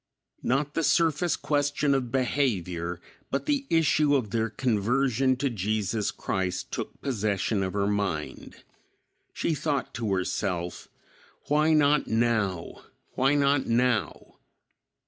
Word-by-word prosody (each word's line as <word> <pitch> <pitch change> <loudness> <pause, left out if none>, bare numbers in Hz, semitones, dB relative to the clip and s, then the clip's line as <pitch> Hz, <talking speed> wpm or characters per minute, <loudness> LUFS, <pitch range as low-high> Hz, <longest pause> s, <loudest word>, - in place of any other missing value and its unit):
Not 140 +3 0
the 165 - 0
surface 165 +2 +2
question 145 -1 0
of 130 -3 -1
behavior, 95 -11 -1 0.3
but 140 - -2
the 285 -2 0
issue 155 -2 +3
of 115 -7 -1
their 115 -1 0
conversion 125 +3 +1
to 140 +2 -1
Jesus 105 -1 -1
Christ 95 -2 -3
took - - -5
possession 105 -5 -1
of 95 -1 -2
her 100 -1 0
mind. 100 -7 -3 0.8
She 165 - -1
thought 145 -3 -2
to 115 -4 -2
herself, 90 -1 -2 0.6
"Why 150 +2 +3
not 150 -1 +3
now? 110 -6 0 0.3
Why 135 +3 +2
not 140 -1 +2
now?" 120 -2 0
125 Hz, 120 wpm, -27 LUFS, 100-145 Hz, 0.8 s, issue